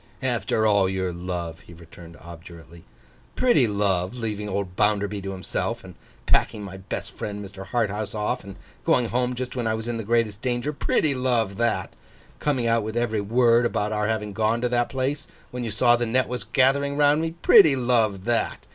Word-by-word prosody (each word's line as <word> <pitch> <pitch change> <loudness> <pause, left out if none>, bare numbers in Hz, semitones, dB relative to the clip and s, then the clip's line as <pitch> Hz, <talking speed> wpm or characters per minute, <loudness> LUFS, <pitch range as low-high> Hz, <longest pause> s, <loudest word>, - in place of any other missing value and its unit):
'After 120 -3 0
all 100 -3 +3
your 95 -1 -2
love!' 85 -1 -5
he 85 - -15
returned, 85 0 -14
obdurately. 85 -1 -13 0.5
'Pretty 240 - +4
love! 100 -1 0
Leaving 105 -3 -4
old 95 -2 -3
Bounderby 105 -1 +1
to 95 0 -5
himself, 95 -2 -3
and - - -11 0.3
packing 105 - +1
my 95 -1 -8
best 95 - -6
friend 105 -1 -6
Mr. 95 0 -10
Harthouse 110 -1 -2
off, 105 +4 -2
and 100 -1 -10 0.3
going 120 -2 +2
home 125 +1 0
just 125 +1 -5
when 120 -3 -1
I 110 - +1
was 110 +1 -5
in 120 -1 -2
the 115 - -4
greatest 110 -1 0
danger. 125 +3 -1
Pretty 145 0 +1
love 120 -6 0
that! 120 -1 -1 0.5
Coming 135 -5 0
out 115 0 +2
with 110 +2 -4
every 115 -3 0
word 115 +3 +3
about 105 -3 -1
our 105 -1 0
having 105 -2 -2
gone 110 +2 +1
to 125 - 0
that 120 0 +1
place, 140 +2 -2 0.2
when 125 0 -4
you 115 - -3
saw 120 +3 +4
the 120 0 -1
net 130 +3 +1
was 125 -4 -4
gathering 140 +5 +2
round 145 +1 +4
me. 165 0 -3
Pretty 145 -4 +7
love 115 -6 +1
that! 120 -1 -1
110 Hz, 190 wpm, -24 LUFS, 100-125 Hz, 0.5 s, Pretty